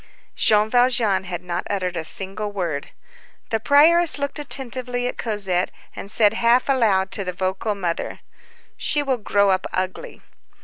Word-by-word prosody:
Jean 210 0 +3
Valjean 235 -5 +2
had 175 -1 -5
not 175 0 -3
uttered 185 -3 -2
a 165 - -3
single 195 +5 -2
word. 170 -8 -3 0.6
The 225 - +1
prioress 315 +7 +5
looked 280 +1 -3
attentively 250 -3 -4
at - - -5
Cosette, 195 -5 -1 0.3
and 200 - -8
said 210 -1 +3
half 235 +2 +3
aloud 210 -8 +2
to 200 - -2
the 180 -1 -4
vocal 190 +4 -2
mother:— 175 -4 -4 0.6
"She 295 -1 +2
will 265 -3 -1
grow 200 -1 +2
up 185 0 0
ugly." 185 - -4
210 Hz, 150 wpm, -22 LUFS, 185-250 Hz, 0.6 s, prioress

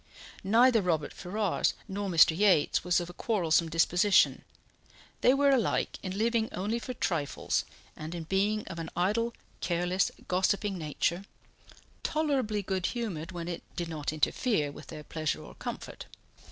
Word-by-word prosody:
Neither 230 +3 +5
Robert 165 -5 -1
Ferrars 200 +1 -1
nor 200 0 -3
Mr. 165 -2 +6
Yates 190 -5 +3
was 180 0 +3
of 175 - -4
a 175 - -10
quarrelsome 170 -6 +1
disposition; 175 +5 +3 0.8
they 250 - +6
were 280 +1 +4
alike 250 -6 +1
in 185 0 -4
living 225 0 +1
only 210 +6 -2
for 255 +1 -6
trifles, 160 -10 -1 0.3
and 155 +3 -6
in 170 - -4
being 200 +5 0
of 170 -2 -6
an 165 0 -5
idle, 230 +6 +1 0.2
careless, 180 +2 +1 0.2
gossiping 195 +2 +1
nature, 170 +3 -1 0.8
tolerably 265 -10 0
good 190 -2 -1
humoured 195 -9 -4
when 170 -2 -5
it 175 -1 -4
did 170 -1 -3
not 150 -3 -3
interfere 155 - +1
with - - -12
their 150 - -8
pleasure 155 -1 -3
or - - -11
comfort. - - -7
185 Hz, 150 wpm, -29 LUFS, 165-215 Hz, 0.8 s, Mr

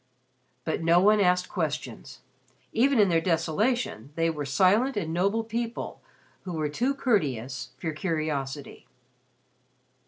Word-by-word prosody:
But 160 - -1
no 165 +1 +5
one 210 +3 +5
asked 180 -1 +3
questions. 150 - -4 0.5
Even 265 +3 +3
in 205 - +6
their 165 -1 +3
desolation 165 - 0
they 165 0 +1
were 150 -2 -4
silent 205 - +3
and 165 -5 -2
noble 200 +6 +1
people 230 +1 -4 0.4
who 180 - -6
were 155 -2 -1
too 250 - 0
courteous 135 - -1
for 165 - -3
curiosity. 150 -4 -3
170 Hz, 125 wpm, -27 LUFS, 150-215 Hz, 0.5 s, in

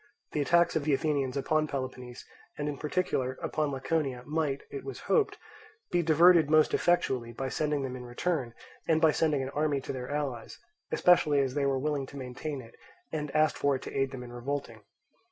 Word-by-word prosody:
The 150 - 0
attacks 170 +4 +3
of 160 - +1
the 145 -1 +3
Athenians 140 -3 -1
upon 155 +2 +1
Peloponnese, 130 -3 -6 0.3
and 145 - -2
in 145 - -2
particular 145 -5 -1
upon 155 -2 -1
Laconia, 135 -2 -1
might, 150 -3 -1
it 410 - -6
was 405 - -7
hoped, 450 -3 +1 0.5
be 175 - +3
diverted 165 0 +6
most 155 0 +4
effectually 130 -9 +1
by 130 +2 -4
annoying 150 -2 0
them 130 -1 -4
in 125 - -7
return, 125 0 -2 0.3
and 160 -1 +3
by 160 -1 +5
sending 150 -3 +1
an 130 - -5
army 150 -1 0
to - - -5
their 125 -1 -5
allies, 145 -5 -3 0.3
especially 155 -5 +4
as 135 -2 0
they 140 -1 +1
were 135 -1 +1
willing 140 0 -1
to 140 - -10
maintain 130 +2 -5
it 115 - -15 0.4
and 150 -2 -3
asked 155 0 +3
for 140 -1 +2
it 130 - -6
to - - -7
aid 135 0 +1
them 130 -2 -7
in 120 0 -10
revolting. 120 -2 -4
145 Hz, 195 wpm, -29 LUFS, 130-155 Hz, 0.5 s, diverted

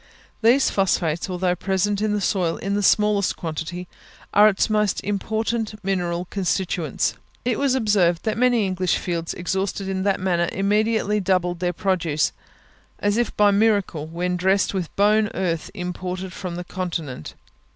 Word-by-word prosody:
These 240 +5 +4
phosphates, 175 -3 0
although 180 0 0
present 195 +3 0
in 215 -1 +1
the 210 0 0
soil 180 -4 0
in 195 +1 -3
the 205 - +1
smallest 205 0 +3
quantity, 170 +2 -5 0.5
are 210 +1 +7
its 195 - +1
most 210 -3 +1
important 220 +2 -2
mineral 180 -2 -1
constituents. 180 -5 -1 0.3
It 245 -2 0
was 275 -2 +2
observed 200 -8 +2
that 220 - -1
many 245 -3 +3
English 185 -1 0
fields 170 -2 -3
exhausted 190 +2 -2
in 190 -1 -2
that 195 0 +1
manner 175 -2 +1
immediately 210 +1 +1
doubled 180 -2 0
their 180 -1 0
produce, 170 -5 0 0.7
as 205 0 0
if 240 0 -1
by 210 0 +6
a - - +3
miracle, 200 -7 +1
when 180 +2 -2
dressed 190 +3 +2
with 185 -4 -2
bone 210 +1 +3
earth 170 -4 -1
imported 180 0 -5
from 180 -3 -5
the 180 - -5
Continent. 165 - -5
190 Hz, 155 wpm, -23 LUFS, 175-210 Hz, 0.7 s, are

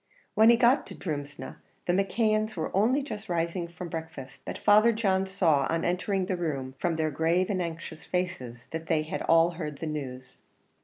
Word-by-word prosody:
When 220 +1 +6
he 235 - +7
got 245 +3 +4
to - - -8
Drumsna, 145 -4 -5 0.3
the 175 - +1
McKeons 215 +3 +1
were - - -3
only 245 +8 +3
just 220 -6 -7
rising 170 +1 -1
from 170 +1 -8
breakfast, 160 -6 -7
but - - -5
Father 215 +3 +5
John 195 -4 +1
saw, 165 -8 +2
on 165 0 0
entering 180 +2 0
the 185 - -1
room, 140 -7 -3
from 170 -2 0
their 155 -1 0
grave 170 +6 +1
and 185 -2 0
anxious 165 -1 -6
faces, 130 -10 -3
that 160 0 -5
they 155 -1 +2
had 155 - -4
all 165 +1 +4
heard 155 -4 -5
the 165 - -5
news. 130 -4 -6
170 Hz, 190 wpm, -28 LUFS, 155-195 Hz, 0.3 s, he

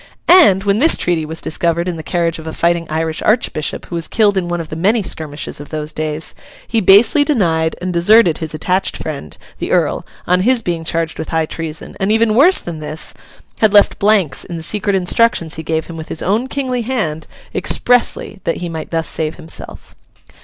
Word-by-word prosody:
And, 310 - +6
when 200 +1 +1
this 320 +5 +5
treaty 165 -3 -1
was 160 +1 -4
discovered 170 +2 0
in 180 - -2
the 160 - -6
carriage 165 0 -1
of 160 - -10
a 160 - -5
fighting 170 -1 0
Irish 160 0 -2
Archbishop 215 -9 -1
who - - -12
was 170 -1 -2
killed 210 -3 +2
in 185 -2 -1
one 175 0 -2
of 165 - -6
the - - -6
many 205 +7 +1
skirmishes 150 -6 -3
of 145 - -10
those 155 -1 -5
days, 155 0 -4 0.3
he 225 - 0
basely 210 +9 +5
denied 165 - 0
and 180 0 -4
deserted 175 0 +4
his 160 -1 -6
attached 185 +5 -1
friend, 140 - -7 0.2
the - - -4
Earl, - - +1 0.2
on 180 +1 +2
his 240 +5 +2
being 170 -2 -3
charged 165 0 -2
with 160 - -5
high 160 -1 0
treason; 160 0 -6
and—even 215 +3 +2
worse 315 - +5
than 170 -2 -6
this—had 160 +7 -3
left 205 -1 +4
blanks 200 -7 +2
in 170 - -7
the 165 - -7
secret 205 +3 0
instructions 185 -2 +2
he 160 - -3
gave 160 0 -2
him 165 - -9
with 160 - -8
his 160 - -3
own 220 +7 0
kingly 260 -3 -2
hand, 215 -11 -3 0.3
expressly 245 -4 +1
that 165 - -1
he 175 - -5
might 160 -1 -6
thus 165 -1 -2
save 155 -1 -2
himself. 165 -2 -8
170 Hz, 200 wpm, -16 LUFS, 160-210 Hz, 0.3 s, And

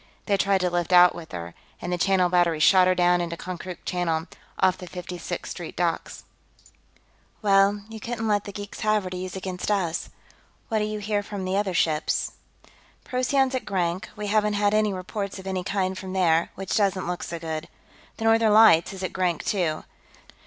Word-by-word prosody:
They 205 - +2
tried 195 -1 +2
to 180 - +1
lift 175 0 -1
out 180 0 +8
with 170 -2 -10
her, 85 -1 -6 0.3
and 175 - -3
the - - 0
Channel 185 -1 +3
Battery 175 -3 +2
shot 185 +3 +6
her 185 - +3
down 175 0 +3
into 170 -1 -4
Konkrook 180 0 -7
Channel, 165 -3 -1 0.3
off 185 -1 +3
the 180 - -8
Fifty 180 0 -7
Sixth - - -5
Street - - -7
docks." - - -2 1.2
"Well, 200 0 +4
you 225 0 -9
couldn't 225 0 -3
let 205 -1 +1
the 200 - -6
geeks 205 0 -8
have 215 -2 +2
her, 185 - -6
to 180 - -4
use 185 0 -5
against 185 0 -4
us. 180 -5 -1 0.6
What 220 -2 +1
do 210 - 0
you 215 0 -3
hear 205 0 -1
from 200 -2 -6
the 185 +1 -1
other 195 -3 0
ships?" 155 -2 +1 0.7
"Procyon's 260 +1 +1
at 260 - -1
Grank; 185 -1 -2
we 210 -1 -5
haven't 210 0 +2
had 205 0 +2
any 215 -1 +3
reports 195 +2 -4
of 190 - -10
any 190 -1 -2
kind 190 0 -1
from 185 0 -7
there, 170 -3 +2
which 195 +1 -3
doesn't 195 -3 +1
look 180 0 -3
so 170 - -5
good. 160 0 -5 0.5
The 225 - -4
Northern 225 -1 +4
Lights 195 -6 +6
is 190 0 -7
at 185 - -3
Grank, 180 -3 -1
too. 175 -7 0
190 Hz, 200 wpm, -25 LUFS, 175-205 Hz, 1.2 s, out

